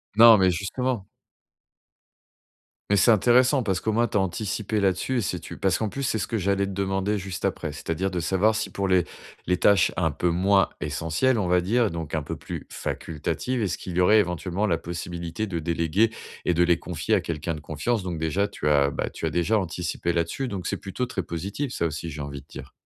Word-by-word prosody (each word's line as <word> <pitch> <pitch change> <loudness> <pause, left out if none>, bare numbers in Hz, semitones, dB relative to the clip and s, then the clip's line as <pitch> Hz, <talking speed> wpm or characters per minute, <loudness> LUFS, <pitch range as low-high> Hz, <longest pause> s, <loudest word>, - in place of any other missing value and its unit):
Non, 115 0 +9
mais 95 -1 +4
justement. 100 +4 -2 1.8
Mais 100 - +4
c'est 115 +5 +6
intéressant 125 +5 +4
parce 95 -4 0
qu'au 110 - -1
moins, 120 +2 +2
tu 105 - -1
as - - +4
anticipé 105 +3 -2
là-dessus 95 +7 +1
et - - 0
c'est 90 - -2
tu - - -9
parce 95 -2 +1
qu'en 110 - -1
plus 140 +7 -5
c'est 120 - 0
ce - - -2
que 115 - -1
j'allais 100 0 +1
te 100 - -5
demander 95 +1 -1
juste 95 -1 -4
après, 75 - -2
c'est-à-dire 85 +6 -3
de 90 - -2
savoir 95 +6 +2
si - - -2
pour 100 -1 -2
les 90 -2 +4 0.4
les 90 - +3
tâches 100 -3 +4
un 80 -3 +1
peu 90 +5 0
moins 95 +3 +3
essentielles, 80 - 0
on 95 - 0
va 90 0 +3
dire 115 +4 +2
donc 80 -3 -5
un 80 - 0
peu 80 +3 -5
plus 70 -1 -7
facultatives, 115 - -3
est-ce 90 -8 -1
qu'il 90 -2 -7
y 90 - +3
aurait 105 +4 +6
éventuellement 90 +2 -1
la 85 -4 +2
possibilité 85 +4 -5
de 85 -3 -3
déléguer 85 +7 +1 0.3
et 90 - +2
de 85 +1 +3
les 85 -1 +3
confier - - -1
à - - +2
quelqu'un 80 0 -3
de 75 - -9
confiance? 100 +9 -2
Donc, 90 -3 -4
déjà, 95 +6 0
tu 75 - -4
as, 70 -2 +4
bah, - - -2
tu - - -6
as, - - +1
déjà, 85 +6 +1
anticipé 85 -2 -2
là-dessus 85 +10 -1
donc 95 -3 -4
c'est - - -1
plutôt 100 +6 -3
très 100 -7 -3
positif 100 - -4
ça 85 - -1
aussi, 80 +1 -3
j'ai 75 -1 -6
envie 70 -1 -6
de 70 - -25
dire. - - -10
95 Hz, 225 wpm, -25 LUFS, 85-105 Hz, 1.8 s, Non